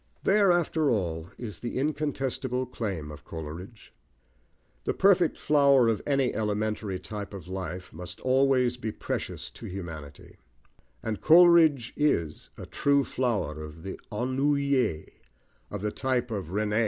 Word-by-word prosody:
There, 200 -1 +4
after 160 -3 +2
all, 85 -6 -1
is 105 -8 -7
the 120 - -4
incontestable 135 -3 -1
claim 95 -11 -4
of 75 0 -11
Coleridge. 85 +7 -9 0.9
The - - -1
perfect 185 -4 +4
flower 140 -4 +4
of 110 -3 0
any 140 -3 +2
elementary 105 -2 -1
type 100 +2 -7
of 90 -4 -9
life 95 -1 -6
must 90 +3 -8
always 130 -1 +3
be 110 -2 -3
precious - - -4
to - - -10
humanity, 80 -6 -8 0.7
and 110 -2 -3
Coleridge 160 -6 +6
is 85 - 0
a - - -7
true 140 0 +2
flower 110 - -1
of 75 +1 -10
the 95 - -6
ennuyé, 130 - +1 0.6
of 105 - -5
the 105 - 0
type 125 -1 -1
of 100 -6 -3
René. 105 +4 0
115 Hz, 135 wpm, -28 LUFS, 95-140 Hz, 0.9 s, Coleridge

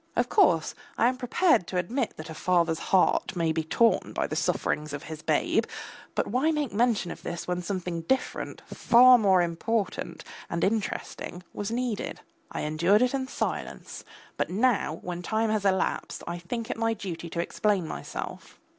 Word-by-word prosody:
Of - - +1
course 170 - +4 0.2
I 235 - +4
am 255 - -3
prepared 250 - +2
to 185 - -3
admit 230 +7 -1
that 155 +1 -7
a - - -5
father's 170 -1 +1
heart 190 +1 +3
may 165 -2 +1
be 160 0 -1
torn 230 +8 +2
by - - 0
the - - -4
sufferings 150 -1 -1
of 145 - -5
his 155 -1 -7
babe, - - +1 0.5
but - - +1
why 255 +8 +1
make 300 -7 -1
mention 220 -5 +1
of - - -8
this 170 - -5
when 180 0 -1
something 180 -2 -3
different, 260 +11 -2
far 250 +1 +6
more 190 -4 +4
important 175 0 -2 0.3
and 170 0 -2
interesting, 195 -3 -2
was 205 - -3
needed? 235 -2 -2 0.3
I - - -3
endured 170 +9 +3
it 250 - +1
in 265 -1 -1
silence, - - -4 0.3
but - - 0
now 210 -5 +1
when 175 -1 -4
time 220 +4 0
has 215 -2 0
elapsed 190 -1 0
I 170 0 -4
think 225 +6 -4
it - - -4
my 225 0 +1
duty 170 -5 -6
to 170 - -4
explain 190 0 0
myself. - - -7
195 Hz, 175 wpm, -27 LUFS, 170-230 Hz, 0.5 s, far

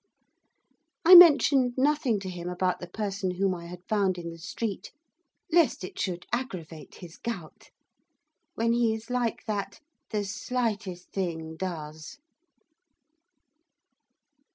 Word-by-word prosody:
I 360 - +9
mentioned 280 -7 +8
nothing 275 -5 +2
to 190 - -6
him 175 0 -6
about 180 0 -1
the 180 - -7
person 195 -3 -3
whom 195 0 +1
I 170 -1 -8
had 180 +1 -11
found 195 -4 +1
in 170 -1 -6
the 165 - -11
street, 200 +5 -5 0.6
lest 330 - +3
it 185 - -8
should 180 -2 -3
aggravate 175 -11 -5
his 170 -3 -12
gout. 195 -10 -7 0.9
When 230 +1 +1
he 235 -2 +2
is 225 +2 -9
like 245 -2 -1
that, 200 -2 -4 0.3
the 210 -2 -1
slightest 205 -3 -3
thing 165 -4 -4
does. 160 - -6
195 Hz, 125 wpm, -27 LUFS, 175-235 Hz, 0.9 s, I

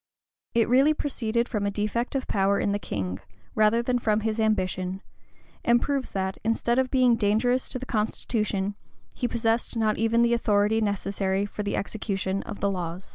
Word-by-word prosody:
It 230 -1 +4
really 270 +5 +4
proceeded 235 -5 -1
from 205 -3 -1
a - - +2
defect 215 +5 -2
of 265 - -1
power 195 0 +2
in 200 - 0
the 205 - 0
king, 95 - -4 0.3
rather 215 +2 +3
than 245 0 +1
from 215 -2 +1
his 220 +1 -1
ambition; 190 -3 0 0.6
and 240 0 +4
proves 275 0 -1
that, 190 -1 -3
instead 230 +2 +1
of 260 0 +1
being 255 -3 +4
dangerous 230 +4 +1
to - - -3
the 255 - -6
constitution, 210 -3 -1 0.4
he 245 - -1
possessed 230 0 0
not 215 -1 +1
even 225 +1 +3
the 235 0 +3
authority 215 -1 +2
necessary 195 -1 0
for 205 - -6
the 205 - -2
execution 195 -2 -2
of - - -7
the 200 - +2
laws. 180 0 -4
215 Hz, 180 wpm, -26 LUFS, 200-235 Hz, 0.6 s, It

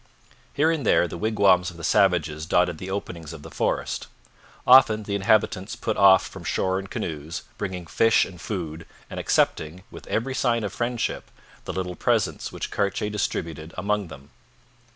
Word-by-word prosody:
Here 155 +3 +3
and 160 -4 -2
there 90 - +3
the - - -7
wigwams 95 -2 +3
of 85 - -12
the 85 - -10
savages 80 -6 +2
dotted 85 -1 +2
the 95 - -6
openings 85 -5 -5
of - - -10
the - - -10
forest. - - -2 0.6
Often 110 -4 +7
the 100 - -4
inhabitants 100 -1 +1
put 110 - -2
off 95 -1 +6
from 95 - -9
shore 95 +4 0
in 95 - -7
canoes, 80 -2 -5 0.2
bringing 95 -3 -4
fish 115 +7 +3
and 90 -2 -11
food, 80 -6 -5 0.2
and - - -5
accepting, 80 +4 0
with - - -11
every 130 +4 -1
sign 120 -3 +1
of 100 -1 -4
friendship, 120 +1 -2 0.4
the - - -4
little 90 -1 -3
presents - - 0
which - - -5
Cartier 105 +1 -1
distributed 80 -5 -3
among 100 +1 -1
them. 70 -2 -13
95 Hz, 170 wpm, -25 LUFS, 85-105 Hz, 0.6 s, Often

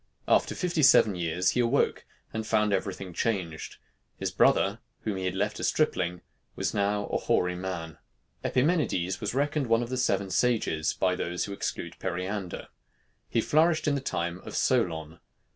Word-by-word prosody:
After - - +3
fifty 175 -3 0
seven 115 -6 +6
years 90 +1 0
he - - -1
awoke, 120 -1 +1 0.3
and 110 0 -3
found 105 -2 +2
every 95 0 0
thing 95 -2 -8
changed. 90 -7 -2 0.4
His - - -2
brother, - - +3 0.2
whom 105 -3 -2
he 95 - -3
had 95 - -1
left 105 +2 -1
a - - -4
stripling, 90 - 0 0.3
was - - -1
now 105 0 +1
a - - 0
hoary 90 0 +1
man. 90 -4 -5 0.4
Epimenides 125 - +1
was 105 +3 -2
reckoned 145 0 0
one 115 +1 +3
of 120 - -6
the 130 - -2
seven 100 -6 0
sages 110 -11 +1
by 95 -1 +2
those 90 0 -2
who 100 - -6
exclude - - -4
Periander. 90 +1 -4 0.6
He 115 - +2
flourished 155 +5 +3
in 145 - +3
the 140 - -1
time 85 -8 -2
of - - -9
Solon. 80 -10 0
100 Hz, 170 wpm, -28 LUFS, 90-125 Hz, 0.6 s, seven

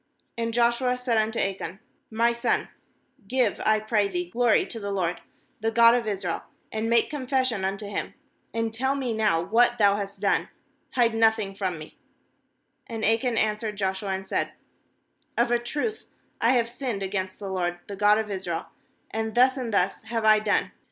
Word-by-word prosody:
"And 230 0 -2
Joshua 240 +2 +2
said 245 -3 +1
unto 220 +1 0
Achan: 195 -1 -2 0.3
'My 230 +2 +2
son, 235 0 0 0.6
give, 245 -3 +1
I 215 0 +3
pray 215 -1 +1
thee, 180 -2 -3
glory 240 0 +3
to 230 - -6
the 200 -1 -4
LORD, 180 -3 -1 0.4
the 225 +1 0
God 230 +1 +6
of 240 -2 0
Israel, 190 -5 -2 0.3
and 220 +1 -2
make 235 +4 +3
confession 255 -6 0
unto 195 +2 -2
Him; 200 - -4 0.4
and 230 -1 -2
tell 265 +4 0
me 260 -4 -2
now 210 -7 +2
what 240 +5 +3
thou 200 -2 +4
hast 200 -1 -5
done; 200 0 +1 0.4
hide 235 -3 +3
nothing 220 -3 +2
from 190 -3 -2
me/ 155 0 -12 0.9
20And 225 -1 +1
Achan 230 0 0
answered 215 0 0
Joshua, 195 0 -2
and 190 0 -3
said: - - -1 0.8
'Of - - +2
a 240 - +3
truth 300 - -3 0.3
I 235 +3 +4
have 235 -2 +2
sinned 235 -4 -4
against 190 -1 -3
the 200 -2 -6
LORD, 175 -2 -1
the 200 - -7
God 210 +1 +4
of 220 -1 -2
Israel, 180 -4 -3 0.4
and 220 0 -3
thus 255 +2 +5
and 250 -4 -4
thus 195 -2 +1
have 225 -1 -2
I 215 0 +7
done. 215 - +1
220 Hz, 180 wpm, -26 LUFS, 200-235 Hz, 0.9 s, I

